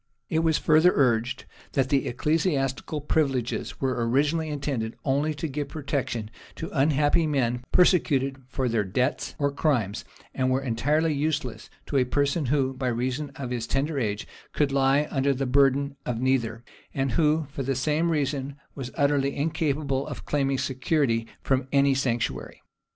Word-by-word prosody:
It 160 - +2
was 160 -1 +2
further 160 +3 +5
urged, 120 -3 +1 0.3
that 135 0 +1
ecclesiastical 145 +1 0
privileges 135 -5 -1
were 130 -3 0
originally 150 +5 +1
intended 135 -6 -3
only 145 +3 +1
to 145 +3 -3
give 145 0 -3
protection 135 -7 -3 0.2
to - - -6
unhappy 145 +3 +3
men 125 -4 0
persecuted 140 -7 +3
for 130 -1 -2
their 115 -3 +1
debts 125 +8 -1
or 140 -1 +1
crimes; 125 -8 0 0.3
and 130 -1 0
were 130 +1 +2
entirely 145 +7 +1
useless 150 +1 -2 0.2
to 140 - -1
a 130 - +5
person 140 +3 0
who, 135 0 +1
by 130 0 -3
reason 125 +4 -1
of 130 -3 -5
his 120 -2 -2
tender 140 +2 0
age, 105 -3 -2 0.3
could 145 -2 +1
lie 135 +2 +3
under 140 0 +1
the 135 +2 -1
burden 140 +1 +3
of 120 -2 -3
neither, 120 -3 0 0.3
and 135 -1 0
who, 155 +4 +2
for 140 - -5
the 135 0 -1
same 155 +5 +1
reason, 140 -3 -1 0.2
was 130 -3 -6
utterly 140 -1 +1
incapable 145 -3 -1
of - - -7
claiming 135 -2 0
security 130 -3 0 0.2
from 130 -1 +1
any 140 -1 +4
sanctuary. 125 -3 -2
135 Hz, 155 wpm, -26 LUFS, 130-150 Hz, 0.3 s, further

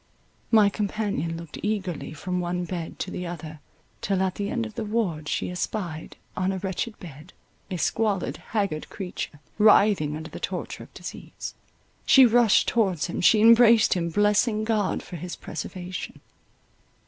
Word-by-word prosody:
My 215 -3 +6
companion 200 -6 -2
looked 170 -2 -9
eagerly 190 -9 -2
from 180 +4 -3
one 180 0 -2
bed 170 -2 -5
to 185 - -4
the 180 - -4
other, 155 -2 -7 0.4
till 190 -1 0
at 190 -1 0
the 200 +1 -3
end 235 0 -1
of 225 - -8
the 225 - -4
ward 200 -9 -1
she - - -1
espied, 180 -3 -4 0.2
on 185 +1 0
a 190 - -2
wretched 190 +4 -3
bed, 160 +1 -11 0.4
a 185 - -3
squalid, 205 +1 0
haggard 200 -8 -3
creature, 180 -6 -6 0.2
writhing 205 -8 +5
under 160 0 -8
the - - -7
torture - - -4
of - - -13
disease. - - -8 0.5
She 265 -1 +7
rushed 235 -2 +4
towards 190 -9 +1
him, 175 - -3
she 210 +4 +5
embraced 230 0 +7
him, 170 -2 -1
blessing 210 +4 +2
God 215 -3 0
for 175 - -8
his 175 +2 -6
preservation. 180 +3 -6
190 Hz, 160 wpm, -25 LUFS, 170-215 Hz, 0.5 s, She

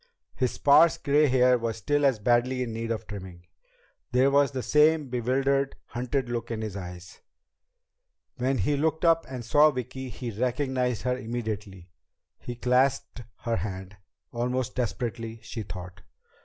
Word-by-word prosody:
His 125 -2 -1
sparse 150 +4 +5
gray 145 +2 +3
hair 125 -1 +4
was 115 -1 -3
still 145 +6 +1
as 130 -4 +1
badly 120 +4 +1
in 115 -2 -5
need 115 0 -4
of 115 -1 -3
trimming. 95 -4 -9 0.7
There 130 +2 +4
was 140 -1 +4
the 130 -2 -4
same 150 -1 +3
bewildered, 135 +3 0
hunted 125 +2 -2
look 120 -1 -4
in 110 -1 -3
his 105 -3 -5
eyes. 90 -2 -9 1.2
When 130 +1 0
he 125 +8 +1
looked 160 +3 0
up 165 0 +3
and 125 -3 -6
saw 150 +5 +6
Vicki, 130 -1 -5
he 120 +1 -6
recognized 125 +1 -1
her 125 0 +1
immediately. 110 -7 -5 0.5
He 120 - -6
clasped 125 +1 +1 0.2
her 115 -1 -1
hand, 95 -1 -5 0.4
almost 125 +1 -1
desperately, 115 -2 -3
she 115 - -6
thought. 90 -2 -8
125 Hz, 150 wpm, -27 LUFS, 110-135 Hz, 1.2 s, saw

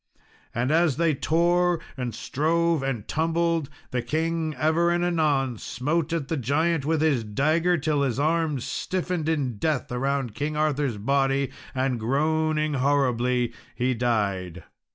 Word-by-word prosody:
And 120 +4 0
as 160 -4 +3
they 165 -1 +2
tore 175 +4 +2 0.2
and 125 -4 -4
strove 165 +5 +1
and 135 -6 -3
tumbled, 165 -1 0 0.2
the 125 - 0
king 160 +2 -1
ever 160 +3 +2
and 175 0 +1
anon 145 -8 +1
smote 155 +5 -1
at 165 -5 -1
the 160 - -1
giant 145 +4 +1
with 160 -1 +1
his 140 -7 +2
dagger, 155 +11 +1
till 150 -1 0
his 135 -2 0
arms 155 -3 0
stiffened 180 -3 -2
in 135 -8 -1
death 150 +2 -1
around 135 -1 -1
King 150 +5 -3
Arthur's 145 -6 0
body, 135 +4 +1 0.2
and 130 -2 0
groaning 155 +5 +1
horribly, 125 -3 +1 0.2
he 130 +1 +1
died. 100 -8 -1
145 Hz, 140 wpm, -25 LUFS, 125-160 Hz, 0.2 s, as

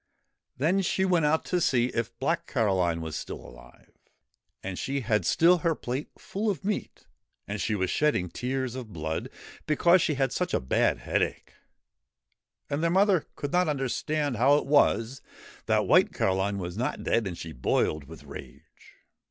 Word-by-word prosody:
Then 170 +9 +2
she 190 0 +1
went 175 -4 +2
out 160 +2 +1
to 180 -1 0
see 125 -5 +2
if 115 0 -3
Black 165 +6 -1
Caroline 95 -8 +1
was 80 -2 -5
still - - -5
alive. - - -15 0.7
And 95 -1 -5
she 140 +1 -2
had 110 -3 0
still 175 +2 +5
her 165 0 +1
plate 130 +3 -4
full 210 +3 -3
of 190 -4 -3
meat, 210 0 -3 0.4
and 100 +1 -3
she 110 - 0
was 95 -2 -1
shedding 150 -12 +1
tears 130 +2 -2
of 125 -4 -7
blood, 80 -2 -4 0.4
because 170 +4 +4
she 150 - +1
had 135 -1 0
such 180 +6 -1
a - - +2
bad 65 - +1
headache. - - -2 1.1
And 140 +2 -2
their 170 - +2
mother 190 -1 +3
could 145 - -4
not 180 0 +3
understand 145 0 -1
how 135 +5 +5
it 145 - 0
was 135 -3 +2 0.5
that - - +2
White - - +5
Caroline 95 +1 0
was 90 -2 -5
not 125 - -2
dead, 115 -3 +1
and 90 -3 -5
she 80 - -7
boiled 75 +2 0
with 80 +2 -12
rage. - - -13
130 Hz, 170 wpm, -27 LUFS, 100-160 Hz, 1.1 s, still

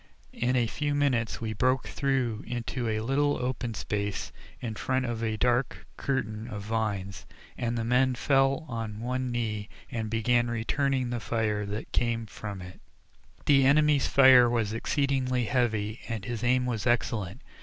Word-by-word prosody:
In 125 +2 0
a 120 -2 +3
few 145 +5 -2
minutes 130 -6 +1
we 110 -1 -3
broke 130 +5 +1
through 130 -6 -1
into 120 0 -3
a 110 0 -1
little 145 +5 +1
open 125 -2 -2
place 105 -1 -3 0.3
in 115 -3 -4
front 130 +4 -1
of 115 -1 -3
a 110 -1 -1
dark 125 +2 0
curtain 110 -5 -2
of 105 -4 -6
vines, 100 -3 -3 0.3
and 120 0 -2
the 115 - -1
men 125 +2 +2
fell 135 +4 +2
on 115 -4 -4
one 125 +2 -2
knee 110 -3 -2 0.2
and 110 -2 -3
began 120 +2 +2
returning 130 +2 0
the 120 - -2
fire 110 -3 -1
that 105 +2 -5
came 115 -1 0
from 100 -2 -7
it. 90 0 -11 0.6
The 140 -2 +5
enemy's 145 +1 +4
fire 130 -3 +7
was 115 -3 0
exceedingly 130 0 0
heavy, 110 -2 0
and 110 -4 -4
his 120 -1 -4
aim 125 +1 +3
was 120 -2 -2
excellent. 110 -5 0
120 Hz, 160 wpm, -28 LUFS, 110-130 Hz, 0.6 s, fire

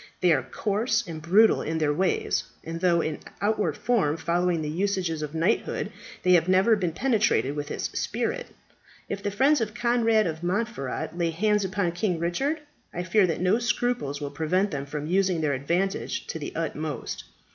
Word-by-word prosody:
They 180 -2 +5
are - - +2
coarse 225 +3 0
and 165 -3 -7
brutal 200 +7 +5
in 160 +1 -2
their 150 -2 +1
ways; 185 +4 0 0.2
and 165 +1 -5
though 175 -2 +3
in 155 -2 -3 0.2
outward 205 -7 0
form 190 -11 +1
following 170 0 0
the - - -3
usages 180 -2 -1
of 150 +1 -5
knighthood, 165 +3 0 0.3
they 180 - +3
have 175 -1 +5
never 190 +5 +5
been 180 -5 -1
penetrated 210 - +1
with 145 0 -4
its - - -4 0.2
spirit. - - -2 0.6
If 200 - -3
the 205 - -1
friends 270 +7 +3
of 215 0 -2
Conrad 235 -3 +3
of 160 -1 -3
Montferat 175 - -2
lay 170 -1 0
hands 210 +5 +1
upon 190 -2 0
King 175 +1 -1
Richard, 270 - -1 0.3
I 175 - -3
fear 185 +2 +3
that 165 - -2
no 185 +5 +3
scruples 240 - -1
will 145 -1 -4
prevent 180 +7 0
them 140 -2 -4
from 150 +1 -4
using 185 +1 +2
their 150 -2 +1
advantage 170 +9 -1
to 160 - -5
the 145 - -5
utmost. 155 -4 -4
180 Hz, 180 wpm, -26 LUFS, 160-210 Hz, 0.6 s, They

